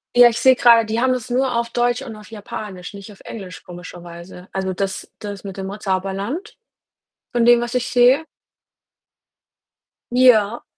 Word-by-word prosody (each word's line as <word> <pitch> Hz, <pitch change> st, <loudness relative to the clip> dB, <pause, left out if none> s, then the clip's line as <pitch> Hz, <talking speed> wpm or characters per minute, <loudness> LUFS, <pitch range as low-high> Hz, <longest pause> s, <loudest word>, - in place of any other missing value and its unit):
Ja, 245 Hz, 0 st, +8 dB
ich 230 Hz, -, -4 dB
sehe 260 Hz, -1 st, +5 dB
grade, 235 Hz, -2 st, +5 dB
die 220 Hz, +2 st, -2 dB
haben 260 Hz, 0 st, +2 dB
das 250 Hz, -2 st, -3 dB
nur 255 Hz, 0 st, +1 dB
auf 235 Hz, 0 st, -1 dB
Deutsch 245 Hz, +2 st, 0 dB
und 230 Hz, -5 st, -8 dB
auf 210 Hz, 0 st, -14 dB
Japanisch, 205 Hz, -4 st, -8 dB
nicht 200 Hz, +1 st, -10 dB
auf 200 Hz, -, -16 dB
Englisch, 190 Hz, -5 st, -9 dB
komischerweise. 175 Hz, 0 st, -11 dB
Also 190 Hz, -1 st, -2 dB
das 195 Hz, +1 st, -4 dB
das 205 Hz, -2 st, -8 dB
mit 195 Hz, -1 st, -8 dB
dem 190 Hz, -, -5 dB
Mo 195 Hz, +2 st, -6 dB
Zauberland, 195 Hz, -, -3 dB, 0.8 s
von 235 Hz, -1 st, +2 dB
dem 240 Hz, 0 st, +6 dB
was 240 Hz, 0 st, -4 dB
ich 250 Hz, -1 st, -1 dB
sehe. 250 Hz, +4 st, +4 dB, 1.9 s
Ja. 240 Hz, -3 st, +4 dB
220 Hz, 165 wpm, -20 LUFS, 195-245 Hz, 1.9 s, Ja